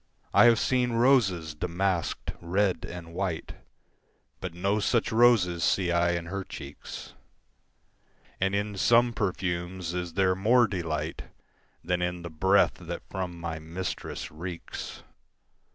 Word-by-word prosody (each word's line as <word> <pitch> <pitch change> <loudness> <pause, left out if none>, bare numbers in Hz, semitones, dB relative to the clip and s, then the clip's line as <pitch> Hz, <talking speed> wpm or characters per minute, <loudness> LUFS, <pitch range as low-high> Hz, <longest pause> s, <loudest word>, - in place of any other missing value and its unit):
I - - +7
have 120 -1 +7
seen 125 -2 +1
roses 115 - +3
damask'd, 90 +2 -1
red 90 0 0
and 85 -1 -8
white, 90 -2 -3 0.9
But 90 -2 -6
no 100 +4 +1
such 115 +2 +1
roses 110 -8 +4
see 90 -3 +2
I 85 0 +3
in 85 -1 -2
her 95 +3 -4
cheeks; 70 -5 -9 1.3
And 95 +1 +1
in 100 0 -2
some 120 +4 +4
perfumes 90 -3 -2
is 90 -2 -4
there 95 -1 +3
more 115 +6 +4
delight 85 -6 -3 0.6
Than 90 0 0
in 90 -1 -2
the 85 - -6
breath 95 +5 +3
that 85 0 -6
from 90 -3 -4
my 85 -1 -4
mistress 85 +4 -5
reeks. 85 +2 -7
90 Hz, 130 wpm, -28 LUFS, 85-100 Hz, 1.3 s, I